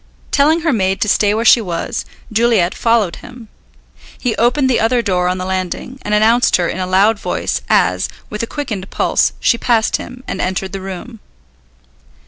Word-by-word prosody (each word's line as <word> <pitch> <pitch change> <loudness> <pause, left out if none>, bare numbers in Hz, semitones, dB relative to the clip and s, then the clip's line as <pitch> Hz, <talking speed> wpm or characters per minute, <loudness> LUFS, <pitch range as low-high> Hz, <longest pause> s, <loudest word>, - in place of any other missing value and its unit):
Telling 310 +4 +3
her 320 -3 +1
maid 190 -3 0
to - - +1
stay 205 0 +3
where 225 +1 -1
she 235 - +6
was, 175 -5 -4 0.3
Juliet 215 -5 +2
followed 230 -6 +1
him. 240 -3 -13 0.7
He 240 -3 -2
opened 250 +4 +2
the 255 - +2
other 235 +2 +1
door 180 -4 0
on 180 +1 0
the 185 - -4
landing, 190 +7 -4
and 210 - -1
announced 225 +3 +4
her 175 -2 +1
in 185 - -4
a 185 - -2
loud 200 +4 +3
voice - - -2
as, - - +2 0.2
with 210 - -5
a 230 - -3
quickened 220 -11 -5
pulse, - - +1
she 235 - +2
passed 230 -3 +1
him, 250 0 -10
and - - -3
entered 190 +1 -2
the 195 -1 -6
room. 195 +5 -8
215 Hz, 185 wpm, -16 LUFS, 190-240 Hz, 0.7 s, she